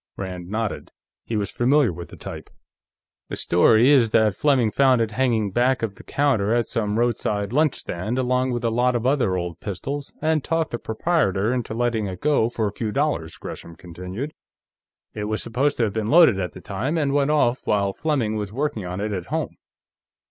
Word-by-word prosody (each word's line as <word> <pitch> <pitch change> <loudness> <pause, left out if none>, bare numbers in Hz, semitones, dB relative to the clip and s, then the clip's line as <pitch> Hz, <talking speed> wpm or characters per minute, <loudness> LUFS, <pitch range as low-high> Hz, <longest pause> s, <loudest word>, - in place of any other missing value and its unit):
Rand 90 -2 -6
nodded. 110 0 -3 0.4
He 115 - -2
was 100 -2 -2
familiar 130 -3 +3
with 85 0 -8
the - - -11
type. - - -8 0.8
"The - - -4
story 110 +8 +4
is 125 -6 +5
that 110 -3 +3
Fleming 130 -6 +2
found 130 -1 +4
it 115 -1 0
hanging 115 -4 +1
back 125 +4 +1
of 110 -3 -1
the - - -15
counter 120 -7 +1
at 120 -1 +1
some 105 -2 -2
roadside 105 -3 0
lunch 150 0 +3
stand, 105 +8 -4
along 130 0 +1
with 120 -1 -2
a 115 - +1
lot 125 +2 +2
of 120 0 -1
other 130 -9 +2
old 85 -1 -4
pistols, 135 +8 -5
and 155 -2 +1
talked 165 -1 -1
the 120 - -3
proprietor 110 - 0
into 120 -3 -3
letting 115 -3 0
it 90 -1 -6
go 145 -6 +2
for 115 -2 -2
a 100 - -4
few 110 0 -3
dollars," 135 - -1
Gresham 85 - -9
continued. 90 - -7 0.8
"It 105 -1 -4
was 110 +1 -2
supposed 135 +5 0
to 120 - +2
have 105 -3 0
been 110 -1 -2
loaded 160 - +6
at 90 -3 -3
the - - -11
time, 145 +8 -2
and 145 -3 +1
went 145 0 +2
off 135 -5 +2
while 100 -2 +1
Fleming 135 -8 -1
was 105 -2 -3
working 130 -3 -2
on 90 +1 -5
it, 105 +1 -2
at 90 -3 -4
home." - - -3
115 Hz, 200 wpm, -23 LUFS, 100-135 Hz, 0.8 s, loaded